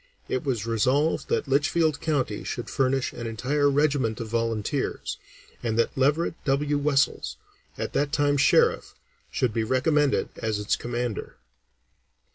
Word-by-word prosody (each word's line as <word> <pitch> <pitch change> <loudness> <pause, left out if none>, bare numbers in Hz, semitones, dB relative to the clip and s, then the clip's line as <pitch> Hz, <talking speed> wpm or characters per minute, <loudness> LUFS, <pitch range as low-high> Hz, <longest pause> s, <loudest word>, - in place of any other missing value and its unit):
It 130 - -2
was 120 -7 -1
resolved 130 +7 +1
that - - 0
Litchfield 145 +3 +2
County 135 -9 -1
should 120 - -5
furnish 135 -1 +1
an 120 - -5
entire 140 +6 +1
regiment 140 -6 +1
of 115 -2 -5
volunteers, 115 -2 -2 0.4
and 115 -2 -1
that 115 - +1
Leverett 145 +6 +2
W. 145 +1 +1
Wessells, 140 -1 +1 0.4
at - - -4
that 145 0 +1
time 145 -1 +2
Sheriff, 140 - +3 0.3
should 125 -4 0
be 115 - 0
recommended 140 +4 +2
as 110 -1 -1
its 105 0 0
commander. 120 -2 -4
135 Hz, 135 wpm, -26 LUFS, 115-145 Hz, 0.4 s, Sheriff